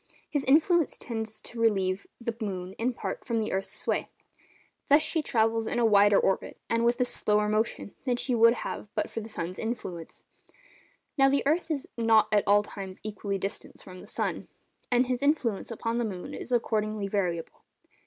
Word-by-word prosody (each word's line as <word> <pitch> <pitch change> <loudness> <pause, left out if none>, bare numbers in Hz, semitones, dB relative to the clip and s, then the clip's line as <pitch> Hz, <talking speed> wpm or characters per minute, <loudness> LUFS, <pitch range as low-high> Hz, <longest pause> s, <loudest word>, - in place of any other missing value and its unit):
His 290 -3 -1
influence 325 +4 +4
tends 220 -2 -5
to 235 - -8
relieve 195 -4 +1
the 235 -1 -3
moon, 185 -3 -4
in 240 +3 +1
part, - - -5
from 235 -3 -1
the 220 -1 -1
earth's 195 0 -3
sway. - - -1 0.8
Thus 295 +1 +6
she 320 - +1
travels 225 -4 +1
in - - -1
a 240 - +3
wider 205 -2 +6
orbit, 195 - 0
and 230 0 +1
with 240 +2 +2
a - - +4
slower 210 -3 +1
motion, 215 -1 -1
than 250 -2 +2
she 250 +1 -1
would 230 0 +6
have - - -5
but - - -1
for 225 - -4
the 220 - -8
sun's 180 -3 -5
influence. 190 -8 -5 0.9
Now 270 0 +6
the 280 +1 +1
earth 325 +4 +1
is 295 -4 -2
not 225 -2 +4
at 205 - +3
all 205 +1 +5
times 195 -2 -8
equally 205 -1 -3
distant 195 +1 -6
from 185 -1 -11
the - - -12
sun, - - -2 0.4
and 245 0 +3
his 250 -1 -2
influence 280 -8 +1
upon 230 +1 -2
the - - +1
moon 185 -4 -6
is - - -7
accordingly 215 -3 0
variable. 180 -5 -2
225 Hz, 185 wpm, -28 LUFS, 200-245 Hz, 0.9 s, Thus